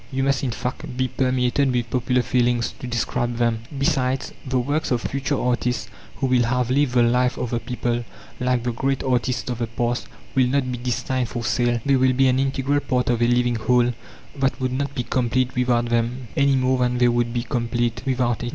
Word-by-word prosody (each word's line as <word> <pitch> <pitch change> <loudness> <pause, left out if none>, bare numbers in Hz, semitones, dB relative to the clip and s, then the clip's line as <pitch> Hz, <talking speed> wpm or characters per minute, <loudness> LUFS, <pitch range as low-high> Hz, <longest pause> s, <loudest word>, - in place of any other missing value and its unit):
You 135 0 -1
must, 135 -1 +1
in 130 - 0
fact, 125 +3 -5
be 130 0 0
permeated 130 +1 +1
with 120 -2 -1
popular 125 0 +1
feelings, 120 -1 +1
to 125 - -6
describe 120 0 -1
them. 115 -2 +1 0.2
Besides, 135 -1 0
the 130 -1 -1
works 145 +5 0
of 125 - +1
future 140 +2 -2
artists 125 0 -1 0.3
who - - -2
will 125 -2 +3
have 125 +1 0
lived 140 -1 +2
the 120 -1 +5
life 125 +1 +2
of 125 - -3
the 120 - 0
people, 120 -1 -2 0.4
like 125 -1 +1
the 120 - 0
great 135 +3 -1
artists 125 -2 0
of 120 - -4
the 120 - -1
past, 120 +2 -2 0.3
will 130 -2 +3
not 130 0 0
be 125 - -4
destined 125 0 -1
for 120 -1 -4
sale. 120 +2 +1
They 140 -1 +4
will 130 0 +3
be 135 +1 +3
an 130 0 +2
integral 135 +1 +1
part 125 -3 0
of 120 -1 0
a 120 - +4
living 120 -1 +2
whole 120 +2 +2 0.5
that 135 -1 +1
would 130 -1 -1
not 140 +1 -2
be 125 - -1
complete 130 +1 0
without 120 -1 +1
them, 120 +1 -1
any 140 0 +3
more 130 0 +2
than 125 0 +1
they 125 0 +4
would 120 0 +1
be 120 0 -2
complete 120 -1 -1
without 125 -3 0
it. 120 - -2
125 Hz, 215 wpm, -23 LUFS, 120-130 Hz, 0.5 s, the